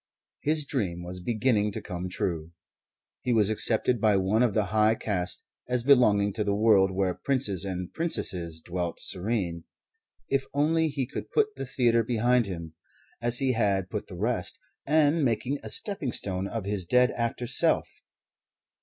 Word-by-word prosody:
His 150 0 +2
dream 95 - -3
was 90 +1 -6
beginning 110 +1 0
to 110 - -3
come 90 -2 -5
true. 85 -2 -3 0.7
He 125 - 0
was 110 -2 +3
accepted 115 +2 +2
by 105 -2 +4
one 95 +4 +1
of 120 -5 +2
the 110 - +3
high 110 +1 +4
caste 90 -5 -2 0.3
as 125 -1 0
belonging 105 -7 +4
to 105 +1 -2
the 100 -1 0
world 105 -3 +4
where 95 -1 0
princes 100 -1 0
and 90 -2 -5
princesses 85 - -1
dwelt 90 -1 -4
serene. 90 -4 -2 0.6
If 135 -1 0
only 160 +3 +2
he 140 -3 -2
could - - -7
put 430 -1 +1
the - - -6
theatre 120 -2 +2
behind 120 0 +1
him, 85 -4 -7 0.5
as 120 0 +3
he 135 0 +3
had 100 -5 0
put 105 -1 -4
the 90 - -10
rest, 105 -1 0 0.3
and 155 +1 +3
make 115 -3 0
a 140 +3 -4
stepping 195 - 0
stone 95 -1 -2
of 110 -1 -5
his 100 -2 -1
dead 125 +8 +3
actor 115 +1 -3
self! 125 - +3
110 Hz, 165 wpm, -27 LUFS, 95-125 Hz, 0.7 s, by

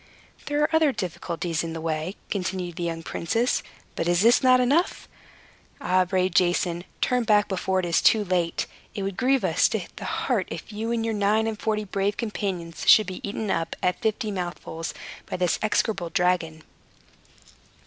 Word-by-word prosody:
"There 290 +1 +1
are 320 +2 +1
other 315 -3 +4
difficulties 170 -4 -3
in 165 -1 -4
the 165 - -5
way," 160 +3 -3 0.2
continued 180 -3 -3
the - - -4
young 165 -1 -3
princes. 225 +12 0 0.3
"But 165 - -2
is 175 +2 +3 0.2
not 255 -1 +6
this 250 - +2
enough? 305 +9 +1 0.7
Ah, 185 0 +2
brave 185 0 0
Jason, 175 -1 +1 0.2
turn 250 -1 +2
back 210 -2 +3
before 190 0 0
it - - -3
is 170 -1 +2
too 215 -2 +4
late. 175 -3 0 0.3
It 200 - -3
would 195 -1 -3
grieve 260 +3 +2
us - - +3
to - - -1 0.2
the - - -6
heart, - - -1
if - - -7
you 220 +2 -3
and 230 -1 0
your 225 - 0
nine 210 +1 +2
and 220 -2 -3
forty 215 -1 -1
brave 200 0 -1
companions 190 -7 -4
should 215 - +8
be 185 - -6
eaten 205 0 -3
up, 165 - -1
at 180 - 0
fifty 220 0 -1
mouthfuls, 175 -3 -5 0.3
by - - -3
this 180 -2 +1
execrable 210 -4 0
dragon." 165 -2 0
190 Hz, 180 wpm, -25 LUFS, 175-220 Hz, 0.7 s, should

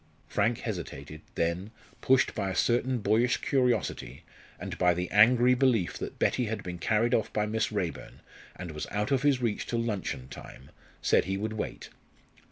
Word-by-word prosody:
Frank 115 +4 0
hesitated, 75 - -6
then, 85 +4 -1 0.3
pushed 130 -1 +3
by 100 -3 -2
a 95 - -4
certain 125 +2 +1
boyish 110 +5 +2
curiosity, 120 - -1 0.4
and - - -5
by 90 -1 +4
the 90 +1 -2
angry 120 +4 +6
belief 125 -8 +2
that - - -6
Betty 125 - +1
had 110 0 -4
been 90 -1 -6
carried 110 +6 +1
off 110 - +1
by 105 - 0
Miss 110 +1 -1
Raeburn, 95 -6 -4 0.3
and 90 -2 -7
was 75 0 -5
out 105 +5 -2
of 135 -2 +2
his 135 -3 +2
reach 110 -3 -1
till 120 - -1
luncheon 100 - -3
time, 65 - -12 0.3
said - - +3
he 95 +1 -2
would 110 +2 -3
wait. 110 - -5
105 Hz, 175 wpm, -29 LUFS, 90-120 Hz, 0.4 s, angry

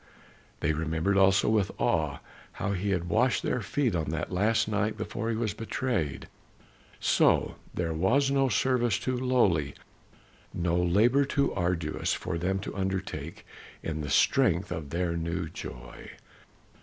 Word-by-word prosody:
They 80 - +1
remembered 80 +5 0
also 95 0 +4
with 105 -3 +2
awe 75 -4 0 0.3
how 100 - -2
he 100 +1 -1
had 90 -3 0
washed 120 +8 +2
their 125 - 0
feet 125 0 0
on 80 -3 -1
that 80 +2 -3
last 105 +5 +2
night 105 0 -1
before 110 +1 -3
he 115 - 0
was 110 -2 -1
betrayed. 115 - -2 0.7
So - - +2 0.2
there 85 -2 -1
was 125 - +2
no 135 -1 +2
service 120 -1 +2
too 130 - -2
lowly, 115 - +1 0.8
no 85 -1 0
labor 105 +11 +3
too 140 0 0
arduous 85 -3 -1
for 90 -2 -4
them 95 +3 0
to - - -6
undertake 95 -5 -4 0.4
in 80 -1 -3
the 75 - -4
strength 100 - +3
of 75 -3 -4
their 85 +2 -1
new 85 +1 -2
joy. 60 -5 -9
95 Hz, 145 wpm, -28 LUFS, 85-115 Hz, 0.8 s, also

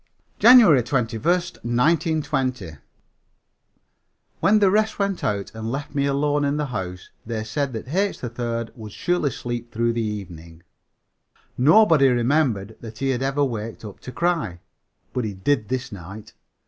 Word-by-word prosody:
JANUARY 225 - +8
21, 120 -2 -2
1920. 150 - 0 1.7
When 210 +2 +4
the 200 -3 +4
rest 215 +2 +1
went 200 -2 -1
out 100 -2 -2
and 110 0 -5
left 145 +3 -5
me 140 -1 +1
alone 145 +1 +1
in 145 +1 0
the 150 - -1
house, 95 -8 -6
they 110 -1 -4
said 140 +5 -2
that 110 +2 -6
H. 195 +6 0
3rd 115 -1 -4
would 110 -3 -9
surely 175 - 0
sleep 120 -1 -5
through 115 +1 0
the 115 - -1
evening. 85 -6 -7 0.9
Nobody 155 - +5
remembered 120 -4 +1
that 110 -1 -9
he 135 +2 0
had 125 -1 -2
ever 135 +2 +1
waked 115 -3 -5
up 105 - -10
to 125 - -9
cry. 165 - -1 0.5
But 125 - -1
he 105 -3 -4
did 105 +2 0
this 130 -1 -3
night. 100 +2 -10
125 Hz, 150 wpm, -23 LUFS, 110-150 Hz, 1.7 s, JANUARY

